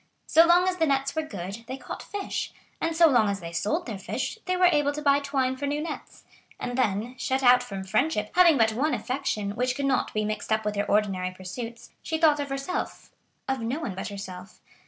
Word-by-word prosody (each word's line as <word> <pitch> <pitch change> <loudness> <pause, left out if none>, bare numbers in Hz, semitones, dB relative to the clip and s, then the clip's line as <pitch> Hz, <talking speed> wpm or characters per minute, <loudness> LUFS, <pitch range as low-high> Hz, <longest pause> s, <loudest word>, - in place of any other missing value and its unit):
So 330 +1 +6
long 355 +2 +5
as 370 -1 0
the 325 -2 +2
nets 275 0 0
were 315 - +1
good, 200 - -7
they 260 +2 -5
caught - - -7
fish; 405 -1 -4 0.3
and 330 0 0
so 335 +1 +7
long 240 -8 +4
as 200 0 -2
they 170 -2 -7
sold 210 - -1
their 215 -6 -5
fish, 225 - -4
they 365 0 0
were 365 - +5
able 295 -5 +4
to 300 - -4
buy 280 -1 +5
twine 270 -2 0
for 285 +2 -2
new 290 +1 -1
nets. 305 0 -7 0.4
And 245 - -3
then, 230 -1 0
shut 265 +1 0
out 250 0 +7
from 195 -6 -6
friendship, 210 +2 0
having 345 -4 +6
but 220 -2 +3
one 295 +7 +1
affection, 250 -6 -2
which 250 +4 -1
could 280 - -2
not 265 -2 +1
be 215 0 -1
mixed 215 +1 -4
up 220 0 +1
with 210 0 -1
her 205 0 0
ordinary 195 -3 +1
pursuits, 230 +6 -8
she 320 - -2
thought 310 -2 +4
of 285 -1 -3
herself—of 275 -2 -5
no 235 +6 -2
one 235 -11 -4
but 190 - -5
herself. 195 -1 -8
255 Hz, 220 wpm, -26 LUFS, 210-300 Hz, 0.4 s, so